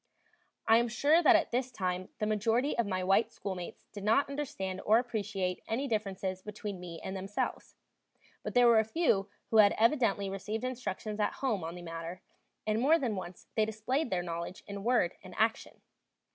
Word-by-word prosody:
I 225 Hz, -, +7 dB
am 235 Hz, +1 st, +2 dB
sure 290 Hz, +8 st, +3 dB
that 350 Hz, +1 st, +7 dB
at 325 Hz, -, +2 dB
this 250 Hz, +1 st, -1 dB
time 185 Hz, -4 st, -2 dB
the 215 Hz, -, -1 dB
majority 225 Hz, +6 st, +1 dB
of 235 Hz, -3 st, 0 dB
my 185 Hz, -2 st, -1 dB
white 195 Hz, +4 st, +3 dB
schoolmates 185 Hz, -3 st, -6 dB
did 205 Hz, -, -8 dB
not 225 Hz, +7 st, +3 dB
understand 275 Hz, -10 st, -4 dB
or 215 Hz, +2 st, +5 dB
appreciate 205 Hz, -6 st, -2 dB
any 260 Hz, +5 st, -1 dB
differences 195 Hz, -4 st, -2 dB
between 205 Hz, -1 st, -6 dB
me 170 Hz, -2 st, -8 dB
and 190 Hz, -, -4 dB
themselves; 195 Hz, +2 st, -3 dB, 0.7 s
but -, -, -6 dB
there 245 Hz, 0 st, +6 dB
were 235 Hz, -2 st, +7 dB
a -, -, +4 dB
few 220 Hz, -, +1 dB, 0.2 s
who 225 Hz, -, +4 dB
had 205 Hz, -2 st, +7 dB
evidently 225 Hz, -5 st, +3 dB
received 195 Hz, +4 st, -4 dB
instructions 230 Hz, -4 st, -4 dB
at 210 Hz, -, +1 dB
home 225 Hz, -10 st, -1 dB
on 165 Hz, +2 st, -5 dB
the 175 Hz, -, -9 dB
matter, 165 Hz, +1 st, -6 dB, 0.4 s
and 215 Hz, +1 st, +1 dB
more 305 Hz, +6 st, +5 dB
than 245 Hz, -8 st, -1 dB
once 185 Hz, -2 st, -7 dB
they 220 Hz, -, +2 dB
displayed 230 Hz, +7 st, -1 dB
their 180 Hz, -3 st, 0 dB
knowledge 170 Hz, +1 st, -5 dB
in 200 Hz, -1 st, -6 dB
word 235 Hz, -7 st, +2 dB
and 185 Hz, -1 st, -11 dB
action. 220 Hz, +1 st, 0 dB
215 Hz, 185 wpm, -31 LUFS, 190-240 Hz, 0.7 s, I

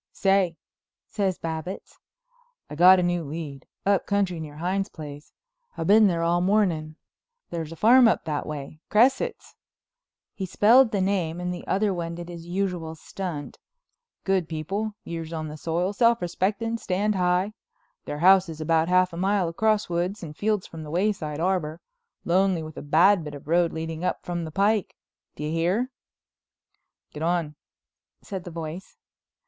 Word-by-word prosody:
"Say," 195 Hz, -4 st, +2 dB, 0.5 s
says 195 Hz, -4 st, -1 dB
Babbitts, 160 Hz, +3 st, -6 dB, 0.7 s
"I -, -, -5 dB
got 180 Hz, +3 st, +7 dB
a -, -, +1 dB
new 175 Hz, -1 st, 0 dB
lead—up 155 Hz, +5 st, -3 dB
country 195 Hz, -4 st, 0 dB
near 150 Hz, -2 st, -7 dB
Hines' 190 Hz, +4 st, -1 dB
place. 145 Hz, -2 st, -10 dB, 0.5 s
I -, -, -2 dB
been 210 Hz, +5 st, +6 dB
there 170 Hz, -3 st, 0 dB
all 170 Hz, +1 st, +2 dB
morning. 180 Hz, -6 st, +1 dB, 0.6 s
There's 165 Hz, -2 st, -4 dB
a -, -, -7 dB
farm 240 Hz, +7 st, +6 dB
up 225 Hz, -, +1 dB
that 150 Hz, -2 st, -3 dB
way. 150 Hz, 0 st, -7 dB
Cresset's"—he 265 Hz, -, -2 dB
spelled 225 Hz, +7 st, +5 dB
the 200 Hz, -3 st, 0 dB
name 180 Hz, -4 st, 0 dB
and 180 Hz, 0 st, -2 dB
the 175 Hz, -, -8 dB
other 200 Hz, +1 st, +1 dB
one 170 Hz, -1 st, -4 dB
did 175 Hz, 0 st, -8 dB
his 170 Hz, -1 st, -9 dB
usual 175 Hz, -3 st, -2 dB
stunt—"Good 195 Hz, -, -5 dB
people, 195 Hz, +7 st, -3 dB
years 165 Hz, -1 st, -6 dB
on 155 Hz, -2 st, -4 dB
the 150 Hz, -, -7 dB
soil, 170 Hz, +5 st, -1 dB
self 230 Hz, +2 st, +3 dB
respecting, 205 Hz, +6 st, -1 dB
stand 205 Hz, +3 st, 0 dB
high. 180 Hz, +2 st, +1 dB, 0.5 s
Their 145 Hz, -, -4 dB
house 185 Hz, +2 st, +5 dB
is 160 Hz, -1 st, -7 dB
about 160 Hz, +1 st, +2 dB
half 185 Hz, 0 st, +3 dB
a -, -, -6 dB
mile 190 Hz, 0 st, +1 dB
across 215 Hz, +5 st, +1 dB
woods 175 Hz, +4 st, -2 dB
and 150 Hz, -2 st, -7 dB
fields 210 Hz, +1 st, 0 dB
from 165 Hz, -, -9 dB
the 155 Hz, -, -8 dB
Wayside 170 Hz, -4 st, -1 dB
Arbor, 170 Hz, -3 st, -1 dB, 0.5 s
lonely 185 Hz, -1 st, +2 dB
with 155 Hz, 0 st, -9 dB
a -, -, -6 dB
bad 170 Hz, +5 st, +4 dB
bit 150 Hz, -1 st, -7 dB
of 140 Hz, -, -12 dB
road 170 Hz, +1 st, +3 dB
leading 160 Hz, +1 st, -5 dB
up 180 Hz, -, -2 dB
from 175 Hz, -1 st, -3 dB
the 160 Hz, -, -7 dB
pike. 200 Hz, +3 st, +1 dB, 0.4 s
Do -, -, -6 dB
you 150 Hz, -, -2 dB
hear?" 180 Hz, +10 st, 0 dB, 1.2 s
"Get 150 Hz, -, -7 dB
on," 165 Hz, -2 st, 0 dB, 0.7 s
said 190 Hz, -3 st, -6 dB
the -, -, -6 dB
voice. 165 Hz, +2 st, -7 dB
175 Hz, 160 wpm, -25 LUFS, 160-195 Hz, 1.2 s, got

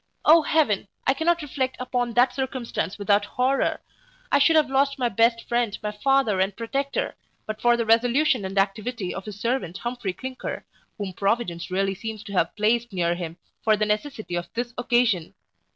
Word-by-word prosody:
O 325 Hz, +2 st, +8 dB
Heaven, 290 Hz, -11 st, +1 dB, 0.2 s
I 270 Hz, -, +4 dB
cannot 330 Hz, +3 st, +1 dB
reflect 260 Hz, -2 st, -2 dB
upon 245 Hz, -1 st, -1 dB
that 245 Hz, +2 st, +4 dB
circumstance 255 Hz, -, -3 dB
without 205 Hz, 0 st, +2 dB
horror 255 Hz, +6 st, 0 dB, 0.5 s
I 285 Hz, -, +5 dB
should 325 Hz, +3 st, +5 dB
have 310 Hz, -2 st, +5 dB
lost 275 Hz, +1 st, +1 dB
my 250 Hz, -2 st, +1 dB
best 230 Hz, +2 st, +2 dB
friend, 235 Hz, -3 st, 0 dB
my 210 Hz, -, -1 dB
father 225 Hz, -2 st, +2 dB
and 190 Hz, +1 st, 0 dB
protector, 275 Hz, +5 st, -2 dB, 0.3 s
but 215 Hz, 0 st, -5 dB
for 240 Hz, 0 st, +4 dB
the 230 Hz, -, 0 dB
resolution 245 Hz, +3 st, +3 dB
and 190 Hz, +1 st, -5 dB
activity 195 Hz, +1 st, -1 dB
of 195 Hz, -, -6 dB
his 205 Hz, -2 st, -8 dB
servant 230 Hz, -6 st, -1 dB
Humphry 240 Hz, -6 st, -3 dB
Clinker, 260 Hz, +5 st, -6 dB, 0.3 s
whom 200 Hz, -3 st, -4 dB
Providence 195 Hz, -4 st, -1 dB
really 195 Hz, +1 st, 0 dB
seems 215 Hz, +2 st, -6 dB
to 200 Hz, -1 st, -9 dB
have 170 Hz, -3 st, +1 dB
placed 225 Hz, +2 st, +1 dB
near 175 Hz, -3 st, +1 dB
him 170 Hz, -1 st, -6 dB, 0.3 s
for 215 Hz, -1 st, +4 dB
the 215 Hz, -, +1 dB
necessity 215 Hz, -1 st, -3 dB
of 175 Hz, 0 st, -3 dB
this 240 Hz, 0 st, -3 dB
occasion. 240 Hz, -8 st, +1 dB
230 Hz, 180 wpm, -25 LUFS, 200-260 Hz, 0.5 s, O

